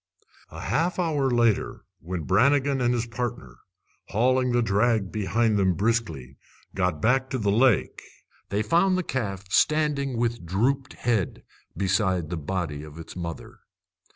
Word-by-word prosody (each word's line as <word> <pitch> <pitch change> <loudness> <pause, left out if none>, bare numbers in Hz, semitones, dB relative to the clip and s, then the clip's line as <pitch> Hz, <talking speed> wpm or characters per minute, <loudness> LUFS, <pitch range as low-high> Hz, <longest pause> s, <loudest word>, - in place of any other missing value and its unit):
A - - -9
half 170 +3 0
hour 155 -6 +1
later, 120 -4 +1
when 85 0 -5
Brannigan 135 - +2
and 120 -1 +2
his 120 -1 0
partner, 115 - -5 0.5
hauling 125 +3 +2
the 120 0 +2
drag 105 -1 +1
behind 105 +1 +1
them 95 -2 +2
briskly, 85 - -2 0.4
got 90 -5 -1
back 130 +3 +2
to 130 - -2
the 105 -4 0
lake, 115 -1 +2 0.5
they 105 +2 0
found 180 - +3
the 185 - -1
calf 100 - -3
standing 145 -2 +2
with 115 -3 -1
drooped 125 +10 0
head 115 -6 -1 0.3
beside 95 -4 0
the - - -1
body 80 -2 -3
of 75 0 -11
its 80 -1 -10
mother. 85 -2 -7
115 Hz, 145 wpm, -25 LUFS, 95-130 Hz, 0.5 s, found